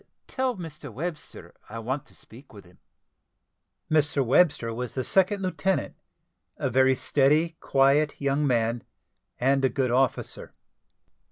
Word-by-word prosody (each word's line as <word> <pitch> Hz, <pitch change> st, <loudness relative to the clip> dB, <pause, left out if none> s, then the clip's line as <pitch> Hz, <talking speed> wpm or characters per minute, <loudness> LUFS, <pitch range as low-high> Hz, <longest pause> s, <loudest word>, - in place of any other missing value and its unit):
Tell 260 Hz, -4 st, -2 dB
Mr 155 Hz, -5 st, -9 dB
Webster 155 Hz, +6 st, -7 dB, 0.2 s
I 115 Hz, -, -7 dB
want 130 Hz, +6 st, -4 dB
to -, -, -19 dB
speak 125 Hz, +4 st, -16 dB
with 100 Hz, -3 st, -13 dB
him." 90 Hz, 0 st, -21 dB, 1.1 s
Mr 145 Hz, -3 st, +1 dB
Webster 135 Hz, -3 st, +2 dB
was 125 Hz, +1 st, -5 dB
the 130 Hz, -, -1 dB
second 195 Hz, -, +2 dB
lieutenant, 190 Hz, +1 st, -1 dB, 0.6 s
a -, -, -2 dB
very 130 Hz, +2 st, +4 dB
steady, 150 Hz, +6 st, +2 dB
quiet, 140 Hz, +2 st, +2 dB
young 140 Hz, +1 st, 0 dB
man, 115 Hz, -1 st, 0 dB, 0.6 s
and 135 Hz, +2 st, +2 dB
a 130 Hz, -, +4 dB
good 130 Hz, -3 st, -1 dB
officer. 130 Hz, 0 st, -1 dB
135 Hz, 135 wpm, -26 LUFS, 125-155 Hz, 1.1 s, very